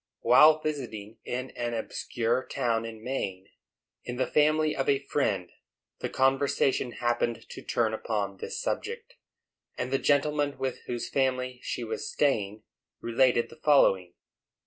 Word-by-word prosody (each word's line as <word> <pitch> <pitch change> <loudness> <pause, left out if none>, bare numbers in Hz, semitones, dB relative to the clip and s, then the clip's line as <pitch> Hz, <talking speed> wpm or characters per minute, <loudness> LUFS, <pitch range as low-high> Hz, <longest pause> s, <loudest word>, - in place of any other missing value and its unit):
While 150 +6 +7
visiting 115 -8 -5
in 130 +1 -4
an 120 -1 -3
obscure 115 +2 -1
town 115 -1 0
in 110 -1 -8
Maine, 95 -7 -4 0.5
in 125 - -5
the 130 - +1
family 155 +1 +2
of 135 - -1
a 140 0 +1
friend, 100 -11 0 0.5
the - - -3
conversation 135 -1 +1
happened 120 -1 -1
to - - -8
turn 115 -2 0
upon 105 -3 -2
this - - -5
subject, 480 -1 -4 0.6
and 125 +1 -3
the 135 - +3
gentleman 145 0 +1
with 130 -1 -3
whose 120 -1 -3
family 130 -2 0
she 120 - -4
was 110 -1 -4
staying 110 -7 0 0.4
related 120 0 +2
the - - -14
following. 95 - +4
125 Hz, 140 wpm, -28 LUFS, 115-140 Hz, 0.6 s, While